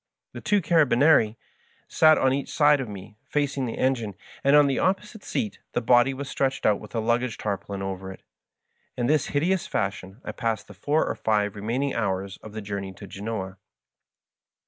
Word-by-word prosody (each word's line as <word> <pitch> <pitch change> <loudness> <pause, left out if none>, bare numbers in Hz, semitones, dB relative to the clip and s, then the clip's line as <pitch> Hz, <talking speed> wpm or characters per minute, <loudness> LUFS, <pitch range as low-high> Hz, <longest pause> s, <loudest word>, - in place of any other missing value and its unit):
The - - -7
two 205 -3 +2
carabinieri 145 -8 +4 0.5
sat 155 -1 +5
one - - +1
on 130 - +4
each 140 0 -2
side 145 -2 +4
of 125 - -5
me 105 +1 -10
facing 140 -3 0
the 115 - -5
engine, 120 -6 0 0.3
and 140 +1 +5
on 150 -1 +7
the 135 -2 +1
opposite 200 +3 -1
seat 215 -5 -3
the - - +1
body 120 +2 +4
was 135 +1 -6
stretched 135 0 -1
out 105 - +3
with - - -11
a - - +1
luggage 120 +1 0
tarpaulin 100 -1 -4
over 95 0 -5
it. 95 - -13 0.7
In 120 - 0
this 150 +2 +2
hideous 170 +6 0
fashion 95 +1 -3
I - - -3
passed 115 -3 -2
the 105 - -12
four 145 +11 +1
or - - -1
five 105 -2 0
remaining 120 +7 -1
hours 95 -3 -2
of 110 - -12
the 110 -1 -6
journey 100 -2 -5
to 100 - -11
Grenoa. 95 -1 -5
120 Hz, 190 wpm, -25 LUFS, 100-140 Hz, 0.7 s, on